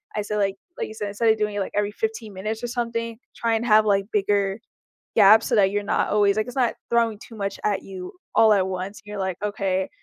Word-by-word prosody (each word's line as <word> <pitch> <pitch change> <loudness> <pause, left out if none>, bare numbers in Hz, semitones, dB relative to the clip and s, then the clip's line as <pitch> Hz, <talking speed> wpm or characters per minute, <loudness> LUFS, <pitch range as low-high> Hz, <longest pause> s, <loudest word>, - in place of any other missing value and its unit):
I 210 - 0
say, 210 0 -3
like 195 -1 0 0.2
like - - -3
you 220 - -9
said, 205 -2 -4
instead 225 +3 +1
of 220 - +4
doing 210 -1 -1
it, - - -1
like, 195 - -3
every 205 0 +1
15 220 -1 -4
minutes 215 +4 -4
or 240 - -1
something, 230 -1 -3 0.2
try 230 -1 0
and 225 - -1
have, 215 -2 +5
like, 200 -1 +2
bigger 200 0 +1 0.6
gaps 215 +2 +7
so - - -2
that 195 -2 +5
you're 205 0 -1
not - - +1
always 205 0 +3
like 215 - 0
it's 245 - -8
not 245 -3 +1
throwing 230 -3 +1
too 230 - -12
much 200 -1 -4
at 205 -2 +1
you 185 -2 -8 0.2
all 220 -1 +6
at 195 -2 +2
once 190 +3 -5
and 205 - -25
you're 210 -1 -6
like, 190 -2 -1
"Okay. 195 -2 -1
210 Hz, 250 wpm, -24 LUFS, 195-220 Hz, 0.6 s, gaps